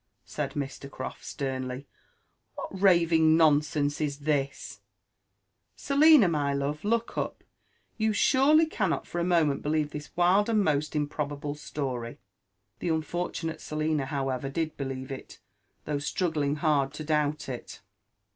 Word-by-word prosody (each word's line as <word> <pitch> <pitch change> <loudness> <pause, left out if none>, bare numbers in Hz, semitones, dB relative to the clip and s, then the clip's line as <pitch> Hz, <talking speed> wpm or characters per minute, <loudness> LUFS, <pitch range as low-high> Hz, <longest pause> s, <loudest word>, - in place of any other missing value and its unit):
said 140 -2 -4
Mr. 140 -1 -5
CrofI - - -7
sternly; 130 -2 -4
•* 140 - -12 0.7
what 190 - -7
raving 165 -4 +5
nonsense 150 -2 +2
is 145 -2 -1
this? 140 -2 -2 1.0
Selina, 285 - +6
my 145 -4 0
love, 145 +2 -2
look 230 +2 0
up; - - -4 0.6
you 220 0 +2
surely 275 +8 +4
cannot 195 - -1
for 175 - -4
a - - +1
moment 165 -5 +2
believe 150 0 0
this 150 0 -7
wild 185 +5 +4
and 215 -2 +3
most 150 -2 0
improbable 145 -1 -2
story 130 -5 -4
1" - - -22 0.6
The 175 - -2
unfortunate 165 0 -2
Selina 155 -2 -1
however 135 -2 -2
did 155 +2 -2
believe 135 -1 -5
it, 135 - -8 0.5
though 145 -1 -1
struggling 150 -2 -1
hard 150 -3 +1
to 155 - -5
doubt 150 -1 0
it. 125 -3 -7
150 Hz, 135 wpm, -28 LUFS, 140-170 Hz, 1.0 s, Selina